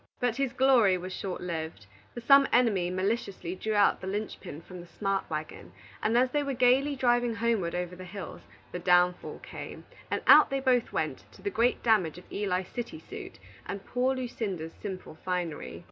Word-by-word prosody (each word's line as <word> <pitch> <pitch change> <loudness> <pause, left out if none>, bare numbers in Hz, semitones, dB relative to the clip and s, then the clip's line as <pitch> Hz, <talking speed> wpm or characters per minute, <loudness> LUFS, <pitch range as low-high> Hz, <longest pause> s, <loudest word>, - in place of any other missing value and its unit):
But 245 -1 0
his 270 -2 0
glory 250 -8 +4
was 185 +1 -6
short 190 -2 -4
lived; 160 - -5 0.3
for 240 - -5
some 275 +3 +6
enemy 215 -8 +3
maliciously 190 -1 -2
drew 215 +3 -2
out 205 -1 +4
the 190 - -6
linchpin 190 -5 -5
from 180 +1 -10
the 175 - -13
smart 195 +2 -2
wagon, 155 - -6 0.3
and 225 +2 +2
as 250 +1 +3
they 295 - +1
were 280 -2 -2
gayly 260 +4 +3
driving 240 -2 +2
homeward 225 -7 0
over 180 0 -3
the 185 - -9
hills, 190 +1 -8 0.3
the 180 - -4
downfall 180 0 +2
came, - - -8 0.2
and - - -2
out - - +8
they 275 - 0
both 255 -3 +2
went, - - -2
to - - -16
the 405 - -1
great 240 -3 +1
damage 200 -9 +2
of 180 - -12
Eli's 185 -2 -1
city 245 +7 -5
suit, - - -9 0.3
and 200 0 -5
poor 255 +2 +1
Lucinda's 205 -10 -4
simple 185 -6 -7
finery. 175 - -3
200 Hz, 185 wpm, -29 LUFS, 180-245 Hz, 0.3 s, out